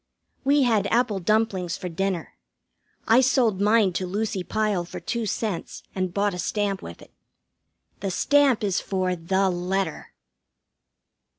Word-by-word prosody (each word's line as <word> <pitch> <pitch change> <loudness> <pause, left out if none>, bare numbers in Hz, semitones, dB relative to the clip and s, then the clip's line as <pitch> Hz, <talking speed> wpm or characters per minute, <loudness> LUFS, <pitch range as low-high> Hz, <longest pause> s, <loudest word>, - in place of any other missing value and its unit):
We 280 +1 +4
had 220 -5 +2
apple 230 -3 +1
dumplings 190 -3 0
for 180 - -5
dinner. 180 0 -3 0.7
I 230 +3 +6
sold 240 -7 +2
mine 210 -2 +4
to 185 +1 -2
Lucy 200 0 -2
Pyle 210 -3 0
for 175 - -8
two 235 -2 -3
cents, 205 -3 -3
and 185 -1 -2
bought 200 +1 0
a 180 - -6
stamp 200 0 -1
with 85 - -10
it. - - -18 0.9
The 195 - -2
stamp 275 +4 +3
is 195 -3 0
for 185 -2 -1
The 190 +3 +1
Letter. 185 +2 -3
195 Hz, 140 wpm, -25 LUFS, 185-220 Hz, 0.9 s, I